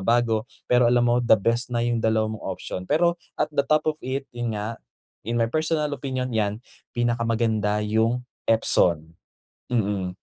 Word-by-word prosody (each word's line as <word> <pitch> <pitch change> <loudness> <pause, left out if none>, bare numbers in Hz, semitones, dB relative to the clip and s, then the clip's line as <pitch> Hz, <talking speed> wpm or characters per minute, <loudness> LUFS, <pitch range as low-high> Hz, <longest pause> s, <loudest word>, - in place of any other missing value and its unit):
bago. 115 +2 +1 0.2
Pero 125 -1 +4
alam 120 0 +3
mo 120 0 +3
the 120 -2 +5
best 115 +4 0
na 120 -1 -1
yung 120 -1 0
2 110 -1 +1
mong 110 - -8
option. 90 - -6
Pero 170 +2 +2 0.2
at 150 - -1
the 140 -1 +1
top 155 0 +3
of 155 0 -1
it, 135 +1 -3
yun 120 -2 -3
nga, 110 +2 -5 0.5
in 120 - 0
my 115 - +3
personal 155 0 0
opinion 130 -2 -3
yan 105 -2 0 0.4
pinakamaganda 115 -3 0
yung 115 +3 +1 0.2
Epson. 85 -7 +3 0.6
Mm. 100 -6 -1
120 Hz, 165 wpm, -24 LUFS, 110-125 Hz, 0.6 s, the